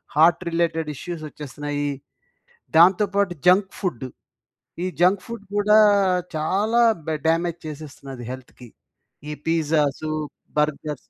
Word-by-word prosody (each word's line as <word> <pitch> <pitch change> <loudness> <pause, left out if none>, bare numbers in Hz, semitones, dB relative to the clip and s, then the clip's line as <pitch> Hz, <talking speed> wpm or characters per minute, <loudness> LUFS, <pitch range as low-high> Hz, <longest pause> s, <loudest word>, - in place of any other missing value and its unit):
Heart 165 +3 +5
related 165 -2 0
issues 170 +3 -6
వచ్చేస్తున్నాయి. 145 0 -4 0.9
దాంతో 185 +4 +6
పాటు 200 -3 +2
జంక్ 190 +2 +4
ఫుడ్. 155 - -3 0.8
ఈ - - 0
జంక్ 185 +2 +4
ఫుడ్ 230 -3 -7
కూడా 210 +1 +4 0.6
చాలా 205 +9 +1 0.3
బ 160 - 0
డామేజ్ 170 +1 0
చేసేస్తున్నది 140 -4 -9
హెల్త్‌కి. 130 -1 -11 0.6
ఈ - - -3 0.2
పిజ్జాసు, 155 -2 +1 0.5
బర్గర్స్ 150 0 -1
160 Hz, 110 wpm, -23 LUFS, 145-180 Hz, 0.9 s, దాంతో